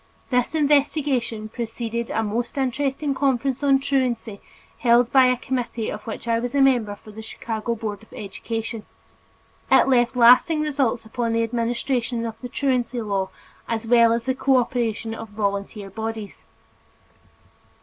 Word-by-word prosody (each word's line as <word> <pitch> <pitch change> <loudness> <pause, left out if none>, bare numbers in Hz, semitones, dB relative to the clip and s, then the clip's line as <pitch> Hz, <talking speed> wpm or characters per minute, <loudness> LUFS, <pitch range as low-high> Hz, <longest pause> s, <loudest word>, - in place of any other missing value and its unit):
This 250 +4 +1
investigation 280 -6 +1
preceded 235 0 -4
a 225 - 0
most 235 +5 -3
interesting 275 +2 -1
conference 270 -1 0
on 275 -1 +4
truancy 255 -6 -1 0.4
held 240 +1 +3
under 255 -1 +7
a - - -4
committee 240 -3 -3
of 210 +1 -8
which 225 - -6
I 230 0 +2
was 245 +3 -4
a - - +3
member 245 -7 +3
from 215 +1 -15
the 220 - -8
Chicago 225 +1 -4
Board 210 -3 -5
of 220 - -20
Education. 225 +2 -5 0.9
It - - +6
left 245 -2 +3
lasting 250 +6 +6
results 270 -6 0
upon 230 +1 -2
the 230 0 +2
administration 235 +1 -1
of 225 -1 -6
the 250 - -6
truancy 255 -2 0
law 200 -4 -1 0.4
as 230 0 -2
well 235 0 +5
as 230 0 0
the 260 - +1
cooperation 240 -4 0
of 225 -1 -7
volunteer 200 -1 -3
bodies. 220 0 -5
235 Hz, 150 wpm, -23 LUFS, 225-260 Hz, 0.9 s, under